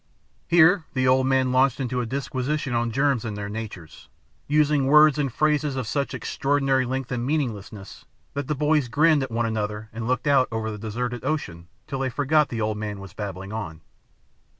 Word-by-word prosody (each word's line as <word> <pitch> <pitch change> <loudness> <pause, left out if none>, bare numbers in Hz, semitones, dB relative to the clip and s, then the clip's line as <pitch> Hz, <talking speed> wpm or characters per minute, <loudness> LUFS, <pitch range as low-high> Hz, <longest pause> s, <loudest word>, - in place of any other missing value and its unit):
Here 170 +1 +5
the 130 0 +2
old 130 +1 +3
man 130 -1 +2
launched 130 +1 +3
into 125 -1 -1
a 120 - -4
disquisition 135 +2 -2
on 120 0 0
germs 135 0 +1
and 105 -3 -5
their 100 0 -5
natures, 105 -7 -8 0.4
using 150 -2 +2
words 150 +1 +6
and 140 -3 0
phrases 150 +1 +1
of 130 -2 -2
such 140 +5 -2
extraordinary 135 -2 0
length 130 0 -3
and 120 -1 -2
meaninglessness, 115 -8 -4 0.3
that 140 -1 -4
the 150 - -1
boys 150 -1 +2
grinned 150 +5 +3
at 135 - -3
one 115 0 -1
another 105 -1 -3
and 115 0 -5
looked 130 +1 0
out 140 -3 +4
over 110 -1 -2
the 105 - -7
deserted 120 +2 -4
ocean 85 - -3 0.2
till 135 - -5
they 135 -1 0
forgot 150 +3 +2
the 115 -2 -3
old 105 0 -1
man 105 -2 -4
was 95 -3 -10
babbling 95 -1 -6
on. 80 -8 -6
130 Hz, 190 wpm, -24 LUFS, 110-145 Hz, 0.4 s, words